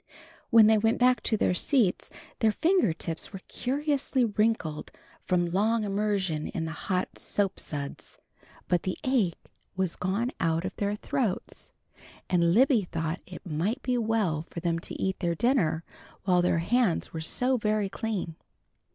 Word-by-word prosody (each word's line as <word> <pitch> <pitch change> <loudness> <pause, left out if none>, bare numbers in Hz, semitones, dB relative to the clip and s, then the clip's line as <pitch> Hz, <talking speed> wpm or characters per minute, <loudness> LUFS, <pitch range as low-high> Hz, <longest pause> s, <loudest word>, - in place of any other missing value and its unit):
When 225 -1 +8
they 220 0 +5
went 225 +2 +2
back 250 0 +4
to 220 - +1
their 180 - +2
seats 220 -1 +2 0.3
their 220 -2 +4
finger 355 - +3
tips 165 0 -5
were 195 -2 -8
curiously 275 -1 0
wrinkled 210 -8 0 0.4
from 180 -1 +2
long 215 +4 +2
immersion 195 -6 0
in 160 - -3
the 160 - -4
hot 180 +3 -3
soap 200 -2 -1
suds, 140 -2 -6 0.5
but 175 -2 +2
the 185 - -3
ache 235 -10 +1 0.4
was 185 -2 -1
gone 205 +7 -1
out 165 0 +1
of 190 - -4
their 205 0 0
throats, 210 -2 -3 0.6
and 170 -2 +4
Libby 250 +3 +5
thought 165 0 -3
it 180 +2 -10
might 185 - -2
be 250 - 0
well 220 -9 +1
for - - -6
them 165 -1 0
to - - -7
eat 190 0 -1
their 170 -2 0
dinner 170 - +2 0.4
while 180 -2 +3
their 175 -1 +2
hands 235 -6 +1
were 160 - -4
so 250 +10 0
very 215 -2 0
clean. 200 -4 -3
195 Hz, 160 wpm, -28 LUFS, 170-230 Hz, 0.6 s, When